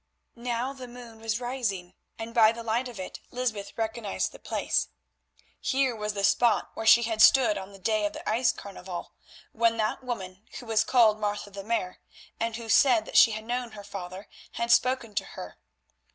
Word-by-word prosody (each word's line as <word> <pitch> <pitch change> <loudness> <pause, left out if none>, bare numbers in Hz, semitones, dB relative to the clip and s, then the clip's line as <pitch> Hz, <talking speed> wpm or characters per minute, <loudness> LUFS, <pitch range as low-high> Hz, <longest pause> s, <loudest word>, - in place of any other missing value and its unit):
Now 240 +2 -2
the 260 -2 -9
moon 240 -2 -12
was 220 0 -2
rising, 225 -8 -3 0.2
and 225 0 -7
by 225 -2 +6
the 230 0 -7
light 230 +3 0
of 235 -5 -9
it 185 - -7
Lysbeth 230 -5 -3
recognised 220 -2 -2
the - - -13
place. - - -1 0.7
Here 265 -2 +1
was 210 -1 -3
the 200 - -2
spot 235 +4 +3
where 225 - -4
she 235 +1 +8
had 225 -1 0
stood 245 -5 +6
on 195 0 -7
the 195 - -12
day 210 +2 +1
of 205 - -8
the - - -9
ice 230 +3 +3
carnival, 190 -3 -8 0.4
when 230 0 +2
that 215 +4 -1
woman 195 -7 -5 0.2
who 245 - -11
was 220 -1 +2
called 220 -3 +4
Martha 205 -1 -3
the 195 0 -7
Mare, 195 -4 -2 0.4
and 230 0 -1
who 230 0 -7
said 240 0 +5
that - - -10
she 225 - +7
had 220 0 -6
known 245 -1 -3
her 205 -1 -9
father, 190 0 -8 0.3
had 235 +1 -1
spoken 240 -1 +2
to - - 0
her. - - -8
225 Hz, 195 wpm, -27 LUFS, 205-240 Hz, 0.7 s, she